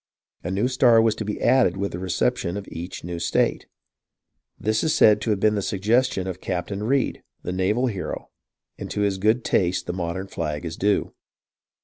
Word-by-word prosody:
A 90 - -3
new 100 +6 +1
star 125 -3 +5
was 110 -1 +4
to 110 - -5
be 105 0 -4
added 120 -7 +3
with 100 +1 -2
the 85 - -5
reception 90 0 -1
of 100 - -7
each 85 +3 -7
new 85 0 -5
state. 85 - 0 0.9
This 110 +1 0
is 160 - +1
said 105 -1 +5
to - - -2
have 105 -2 +1
been 105 +2 +3
the 105 - 0
suggestion 105 +1 +1
of 95 -1 -5
Captain 95 +3 -3
Reid, 130 +5 0 0.2
the - - -3
naval 100 +7 +1
hero, 100 -7 -4 0.5
and - - -6
to 105 - -2
his 100 -2 0
good 110 +4 +2
taste 90 0 +1
the - - -3
modern 90 +1 -3
flag 75 -3 -4
is 80 -1 -4
due. 100 +1 0
100 Hz, 195 wpm, -24 LUFS, 90-110 Hz, 0.9 s, star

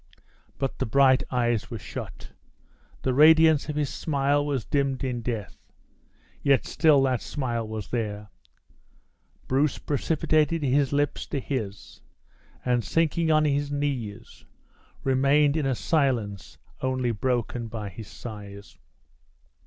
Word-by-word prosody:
But 135 -1 -3
the - - -1
bright 130 +2 +5
eyes 120 -3 0
were 115 - -5
shut; - - -8 0.7
the 130 - +1
radiance 160 +1 +6
of 150 - -3
his 150 -2 -1
smile 145 -1 +1
was 140 -6 -2
dimmed 140 -2 0
in 125 -2 -2
death, 110 -6 -5 0.8
yet 140 -2 +3
still 150 -4 +4
that 130 -2 +1
smile 120 -5 -3
was 110 -4 -6
there. 105 -3 -3 1.2
Bruce 140 +3 +1
precipitated 155 +2 0
his 140 0 +2
lips 145 0 0
to 140 - -2
his, 110 -7 -5 0.6
and 125 -2 +1
sinking 165 +3 +1
on 155 -1 +4
his 145 0 0
knees, 125 -7 -4 0.6
remained 140 +2 +3
in 150 -4 0
a 130 - +1
silence 120 - -1 0.2
only 130 -2 0
broken 120 +1 -2
by 110 -2 -5
his 100 +3 -10
sighs. 100 - -10
130 Hz, 125 wpm, -26 LUFS, 115-145 Hz, 1.2 s, radiance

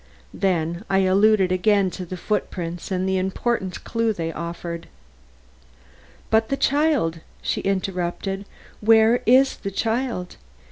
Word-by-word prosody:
Then 170 -1 -1
I 195 0 +3
alluded 195 0 +4
again 195 0 +2
to 180 0 -7
the 185 - -6
footprints 175 -4 -3
and 185 -1 -1
the 190 0 +1
important 190 +1 -2
clue 230 -1 0
they 165 -4 -4
offered. 170 +1 -6 1.4
"But 220 0 +3
the 275 - 0
child?" 280 - +1 0.2
she - - -1
interrupted. 195 0 -2 0.3
"Where 225 +2 +5
is 260 +3 +5
the 195 - -4
child? 225 -2 -2
195 Hz, 125 wpm, -23 LUFS, 180-220 Hz, 1.4 s, Where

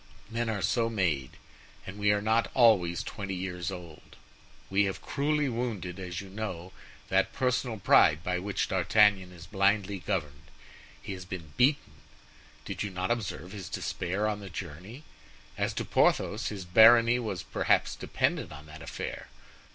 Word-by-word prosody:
Men 115 0 -1
are 105 -3 -2
so 115 +3 +1
made; 85 - -1 0.5
and 95 +2 -8
we 105 0 +3
are 105 0 0
not 110 +2 +2
always 100 -9 +4
twenty 100 -2 -5
years 90 -2 -4
old. 85 -4 -10 0.5
We 100 +1 +2
have 95 - -3
cruelly 150 +1 0
wounded, 115 -7 -3
as 90 -1 -5
you 100 - -10
know, 95 -3 -6 0.4
that - - +2
personal 125 -2 0
pride 80 -5 +5
by 90 0 -1
which 100 +2 -2
D'Artagnan 95 +1 +3
is 85 -2 -12
blindly 100 +1 +1
governed. 80 -5 -4 0.5
He 100 - -6
has 90 -1 -7
been 85 -5 -8
beaten. 140 +4 +2 0.7
Did - - -5
you 100 - -2
not 95 +2 -3
observe 95 -6 -3
his 100 -4 -7
despair 100 +5 -2
on 105 -1 -2
the 100 -1 -9
journey? 95 - -8 0.5
As - - -1
to - - -2
Porthos, 110 +2 +2
his 100 -3 -5
barony 115 +5 +7
was 105 -7 -4
perhaps - - +1
dependent - - -1
on 75 0 -10
that 75 +1 -12
affair. - - -6
100 Hz, 160 wpm, -29 LUFS, 90-110 Hz, 0.7 s, barony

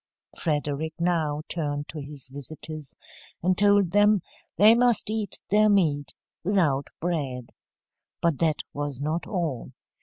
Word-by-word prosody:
Frederick 150 0 -2
now 160 -4 0
turned 145 -3 -3
to 155 - -7
his 140 -1 -8
visitors, 150 +2 -7 0.5
and 185 +1 +3
told 205 -2 +4
them 205 +1 +5 0.4
they 210 +5 +8
must 240 -3 +2
eat 215 -3 -3
their 215 +1 +5
meat 155 -8 +1 0.3
without 165 -8 +2
bread. 140 -8 -3 0.7
But 165 -4 +1
that 160 -2 +1
was 145 -2 -3
not 155 +4 -2
all. 165 - -3
160 Hz, 125 wpm, -26 LUFS, 145-195 Hz, 0.7 s, they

